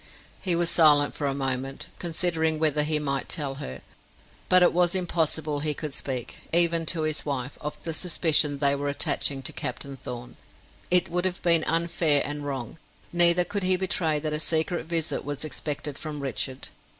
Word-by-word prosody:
He 180 Hz, -3 st, +3 dB
was 170 Hz, 0 st, +1 dB
silent 150 Hz, -3 st, +5 dB
for 145 Hz, -, -3 dB
a 135 Hz, -, -2 dB
moment, 135 Hz, 0 st, -3 dB
considering 165 Hz, -2 st, 0 dB
whether 155 Hz, -1 st, +2 dB
he 155 Hz, +1 st, +1 dB
might 140 Hz, -3 st, -2 dB
tell 145 Hz, -5 st, -2 dB
her. 65 Hz, +1 st, -7 dB, 0.7 s
But 185 Hz, 0 st, +6 dB
it -, -, +4 dB
was 175 Hz, +1 st, +2 dB
impossible 160 Hz, -4 st, -1 dB
he 150 Hz, 0 st, -2 dB
could 150 Hz, -1 st, -5 dB
speak, 130 Hz, -3 st, -4 dB
even 170 Hz, -1 st, +4 dB
to 160 Hz, -1 st, +2 dB
his 155 Hz, -1 st, -2 dB
wife, 140 Hz, -2 st, -4 dB
of 150 Hz, 0 st, -6 dB
the 165 Hz, -, -2 dB
suspicion 155 Hz, -4 st, +3 dB
they 140 Hz, 0 st, +2 dB
were 145 Hz, 0 st, -2 dB
attaching 140 Hz, -1 st, -1 dB
to -, -, -1 dB
Captain 140 Hz, -1 st, -5 dB
Thorn. 125 Hz, -2 st, -9 dB, 0.5 s
It 180 Hz, 0 st, +4 dB
would 175 Hz, +1 st, -1 dB
have 185 Hz, -1 st, -1 dB
been 170 Hz, -2 st, +3 dB
unfair 165 Hz, -3 st, +1 dB
and 145 Hz, 0 st, -5 dB
wrong; 135 Hz, 0 st, -6 dB, 0.3 s
neither 175 Hz, 0 st, +7 dB
could 200 Hz, +3 st, -4 dB
he 185 Hz, 0 st, +3 dB
betray 175 Hz, -4 st, 0 dB
that 150 Hz, 0 st, -3 dB
a 150 Hz, -, 0 dB
secret 160 Hz, +2 st, -1 dB
visit 165 Hz, -2 st, -2 dB
was 145 Hz, +1 st, -4 dB
expected 150 Hz, -2 st, -4 dB
from 150 Hz, -1 st, -6 dB
Richard. 130 Hz, 0 st, -3 dB
155 Hz, 180 wpm, -26 LUFS, 145-170 Hz, 0.7 s, neither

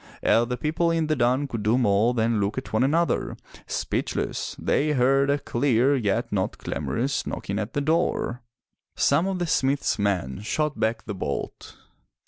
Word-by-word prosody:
Ere 115 Hz, -, +4 dB
the 125 Hz, 0 st, -3 dB
people 155 Hz, +5 st, 0 dB
in 165 Hz, -1 st, +1 dB
the 155 Hz, 0 st, +1 dB
dun 130 Hz, +2 st, +1 dB
could 115 Hz, -5 st, -4 dB
do 110 Hz, +4 st, +2 dB
more 115 Hz, 0 st, +3 dB
than 115 Hz, -1 st, +1 dB
look 100 Hz, +4 st, -1 dB
at 130 Hz, -, -5 dB
one 110 Hz, -, +3 dB
another, 165 Hz, +5 st, +1 dB, 0.3 s
speechless, -, -, -2 dB
they 150 Hz, +1 st, +1 dB
heard 135 Hz, +1 st, +3 dB
a 140 Hz, -, +3 dB
clear, 135 Hz, -1 st, +2 dB
yet 115 Hz, -1 st, -1 dB
not 95 Hz, -2 st, -1 dB
clamorous, 135 Hz, +4 st, -2 dB
knocking 100 Hz, +2 st, -3 dB
at 110 Hz, +2 st, -4 dB
the 145 Hz, -, 0 dB
door. 155 Hz, -5 st, 0 dB, 0.5 s
Some 175 Hz, -, +2 dB
of 190 Hz, -1 st, -1 dB
the 175 Hz, -, -1 dB
smith's 140 Hz, -6 st, +1 dB
men 95 Hz, -10 st, -1 dB
shot 150 Hz, +7 st, -1 dB
back 110 Hz, 0 st, 0 dB
the 105 Hz, -, -4 dB
bolt. 80 Hz, -7 st, -5 dB
125 Hz, 170 wpm, -25 LUFS, 110-145 Hz, 0.5 s, Ere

